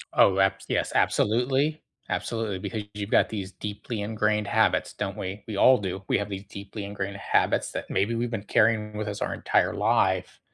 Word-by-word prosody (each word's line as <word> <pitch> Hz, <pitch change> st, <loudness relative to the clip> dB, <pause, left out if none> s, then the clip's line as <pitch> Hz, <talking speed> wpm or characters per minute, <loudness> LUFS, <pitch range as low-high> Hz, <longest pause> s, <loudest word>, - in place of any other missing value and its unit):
Oh, 95 Hz, 0 st, +5 dB
abs 95 Hz, 0 st, +2 dB
yes, -, -, 0 dB
absolutely. 130 Hz, +8 st, +2 dB, 0.3 s
Absolutely, 110 Hz, -5 st, -2 dB
because 110 Hz, +3 st, -4 dB
you've 105 Hz, 0 st, -5 dB
got -, -, +4 dB
these 100 Hz, -3 st, -5 dB
deeply 105 Hz, +1 st, -5 dB
ingrained 105 Hz, 0 st, 0 dB
habits, 110 Hz, -1 st, +2 dB
don't 100 Hz, -2 st, -4 dB
we? 95 Hz, +2 st, -5 dB
We 110 Hz, -, -4 dB
all 130 Hz, +6 st, +6 dB
do. 95 Hz, -1 st, -4 dB
We -, -, +3 dB
have 100 Hz, 0 st, -3 dB
these 95 Hz, -1 st, -5 dB
deeply 100 Hz, +1 st, -8 dB
ingrained 100 Hz, 0 st, -4 dB
habits, -, -, +1 dB
that -, -, -5 dB
maybe 100 Hz, +5 st, +1 dB
we've 120 Hz, +1 st, -1 dB
been 115 Hz, -4 st, -4 dB
carrying 105 Hz, 0 st, +2 dB
with 105 Hz, 0 st, -3 dB
us 100 Hz, -1 st, -5 dB
our -, -, -1 dB
entire -, -, +1 dB
life, -, -, +1 dB
105 Hz, 190 wpm, -26 LUFS, 100-110 Hz, 0.3 s, all